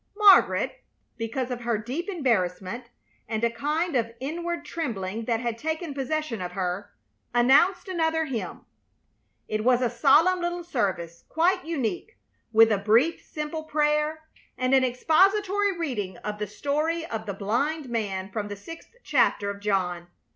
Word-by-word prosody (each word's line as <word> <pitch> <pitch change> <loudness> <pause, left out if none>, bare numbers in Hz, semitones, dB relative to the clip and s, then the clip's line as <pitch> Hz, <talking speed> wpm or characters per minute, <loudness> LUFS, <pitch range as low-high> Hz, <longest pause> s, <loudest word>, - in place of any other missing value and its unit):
Margaret, 415 -2 +5 0.3
because 240 +2 -3
of 245 -1 -4
her 235 -2 0
deep 260 - -4
embarrassment, 230 - -1 0.4
and 220 0 -2
a 235 - +3
kind 305 +6 -1
of 230 -1 0
inward 340 +5 -4
trembling 225 - -4
that 230 -1 0
had 235 -1 -3
taken 315 +1 -3
possession 275 -4 -2
of 180 0 -5
her, 185 +2 -3 0.5
announced 280 +11 +4
another 320 -3 0
hymn. 260 -6 -5 0.8
It 215 0 -2
was 245 0 +4
a 245 -2 0
solemn 300 +9 +4
little 345 0 -2
service, 190 - -2
quite 360 +3 +2
unique, 330 - -3 0.3
with 225 0 +6
a 205 - +2
brief, 230 +11 +3
simple 310 +1 -5
prayer 300 +1 +1 0.3
and 255 +1 +1
an 265 -1 +5
expository 390 - +2
reading 210 - -3
of 210 0 -5
the 210 - -2
story 300 - -1
of 220 -7 -5
the 200 - -3
blind 265 +10 -1
man 200 -5 -3
from 205 0 -3
the 205 - -5
sixth 330 - -11
chapter 235 -7 +2
of 200 - -9
John. 185 -4 -1
255 Hz, 150 wpm, -26 LUFS, 215-320 Hz, 0.8 s, with